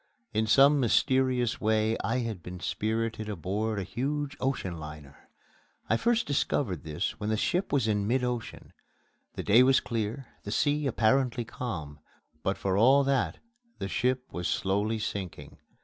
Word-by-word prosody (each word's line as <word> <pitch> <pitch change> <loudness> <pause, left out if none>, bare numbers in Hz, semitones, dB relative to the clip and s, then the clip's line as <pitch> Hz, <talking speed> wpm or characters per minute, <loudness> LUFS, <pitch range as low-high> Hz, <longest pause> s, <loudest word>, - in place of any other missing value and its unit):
In 110 +1 +1
some 140 +5 +6
mysterious 130 -1 +2
way 110 +1 +2
I 115 +6 0
had 110 -6 -4
been 90 +2 -8
spirited 110 +2 -2
aboard 105 +3 -2
a 100 - -1
huge 140 +7 -3
ocean 95 -11 -2
liner. 75 -2 -11 0.6
I - - +5
first 235 - +2
discovered 130 - 0
this 80 +7 -3
when 105 0 -2
the 110 - +1
ship 180 - 0
was 135 -6 +2
in 105 -2 +1
mid 125 +3 +1
ocean. 125 -2 -4 0.6
The - - -4
day 110 +4 +6
was 130 +1 +5
clear, 115 +3 -3 0.2
the - - -8
sea 145 +6 +1
apparently 125 0 +2
calm, 80 - -6 0.4
but 95 +3 -1
for 95 -1 0
all 135 +6 +6
that 135 -1 0 0.4
the 95 - -4
ship 125 +5 0
was 90 -1 -2
slowly 105 +3 0
sinking. 90 -8 -5
110 Hz, 155 wpm, -29 LUFS, 100-130 Hz, 0.6 s, some